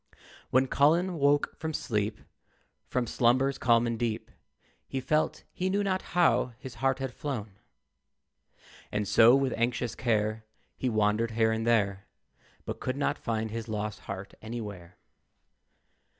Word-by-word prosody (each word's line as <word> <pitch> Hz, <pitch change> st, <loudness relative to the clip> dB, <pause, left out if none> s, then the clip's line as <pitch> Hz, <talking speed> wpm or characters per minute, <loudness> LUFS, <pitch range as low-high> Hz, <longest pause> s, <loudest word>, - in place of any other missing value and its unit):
When 130 Hz, +1 st, +4 dB
Colin 165 Hz, +6 st, +2 dB
woke 145 Hz, +1 st, +2 dB
from 160 Hz, 0 st, -3 dB
sleep, 105 Hz, -1 st, -2 dB, 0.7 s
From 125 Hz, -1 st, 0 dB
slumbers 130 Hz, +4 st, +2 dB
calm 115 Hz, -1 st, +4 dB
and 115 Hz, -1 st, -2 dB
deep, 115 Hz, -2 st, -2 dB, 0.6 s
He 135 Hz, -, -3 dB
felt 155 Hz, +4 st, 0 dB
he 185 Hz, +1 st, -1 dB
knew 200 Hz, +2 st, +1 dB
not 190 Hz, -1 st, 0 dB, 0.2 s
how 165 Hz, -7 st, +3 dB
his 130 Hz, 0 st, -9 dB
heart 135 Hz, -1 st, +2 dB
had 135 Hz, -2 st, -4 dB
flown. 110 Hz, -10 st, -5 dB, 1.3 s
And 105 Hz, -1 st, -1 dB
so, 115 Hz, +5 st, +7 dB
with 135 Hz, -2 st, +1 dB
anxious 120 Hz, 0 st, -1 dB
care, 110 Hz, -2 st, 0 dB, 0.3 s
He 130 Hz, -, -1 dB
wandered 110 Hz, +1 st, +2 dB
here 110 Hz, -1 st, +4 dB
and 110 Hz, +1 st, -1 dB
there, 100 Hz, -4 st, +1 dB, 0.6 s
But -, -, -5 dB
could 130 Hz, +1 st, -3 dB
not 145 Hz, -, 0 dB
find 110 Hz, -1 st, -2 dB
his 115 Hz, 0 st, -5 dB
lost 105 Hz, -1 st, -3 dB
heart 95 Hz, +1 st, -6 dB
anywhere. 105 Hz, -6 st, -7 dB
120 Hz, 140 wpm, -29 LUFS, 110-135 Hz, 1.3 s, so